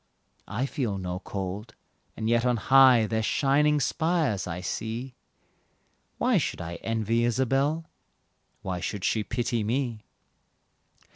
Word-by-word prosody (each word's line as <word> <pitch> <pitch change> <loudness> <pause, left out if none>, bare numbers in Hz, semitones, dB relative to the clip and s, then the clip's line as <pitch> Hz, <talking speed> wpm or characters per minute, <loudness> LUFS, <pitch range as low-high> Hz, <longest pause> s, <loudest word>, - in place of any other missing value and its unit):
I 115 +6 -2
feel 125 -8 -2
no 90 -1 -4
cold, 100 +3 -5 0.4
and 110 - -2
yet 115 0 +3
on 125 -1 +2
high 130 -1 +6
Their 110 +1 -1
shining 145 +5 +2
spires 155 - 0
I 85 0 -4
see. 115 +7 -4 1.0
Why - - +3
should - - -3
I 85 +1 -5
envy 115 +3 0
Isabelle? 135 +6 +1 0.8
Why 90 -1 -3
should 95 +2 -4
she 110 - +1
pity 120 0 -1
me? 120 0 -1
115 Hz, 125 wpm, -27 LUFS, 105-135 Hz, 1.0 s, high